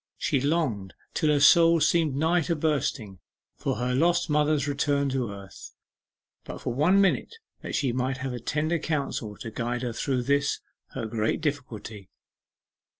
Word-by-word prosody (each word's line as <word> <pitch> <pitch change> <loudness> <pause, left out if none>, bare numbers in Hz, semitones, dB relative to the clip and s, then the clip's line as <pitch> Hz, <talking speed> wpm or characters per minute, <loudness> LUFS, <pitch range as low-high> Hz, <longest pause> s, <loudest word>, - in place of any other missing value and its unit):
She 135 - 0
longed, 135 - -1 0.2
till 155 - +1
her 150 -1 +3
soul 165 +3 +6
seemed 155 -2 +2
nigh 165 +4 +2
to 165 +2 -1
bursting, 140 - -1 0.4
for - - -2
her 125 +3 -1
lost 170 +4 +2
mother's 150 -1 +2
return 140 0 0
to 130 -5 -2
earth, 100 -1 -11 0.7
but - - -7
for 125 - -3
one 170 +10 +3
minute, 200 - +1 0.3
that - - -5
she 130 -4 0
might 130 +1 -1
have 130 -1 -4
tender 155 +3 0
counsel 140 -9 -3
to 115 - -7
guide 120 +2 -3
her 120 -2 -2
through 130 +1 -1
this, 140 +2 +1 0.4
her 125 -4 -3
great 110 +3 -1
difficulty. 120 - -5
140 Hz, 155 wpm, -26 LUFS, 120-155 Hz, 0.7 s, soul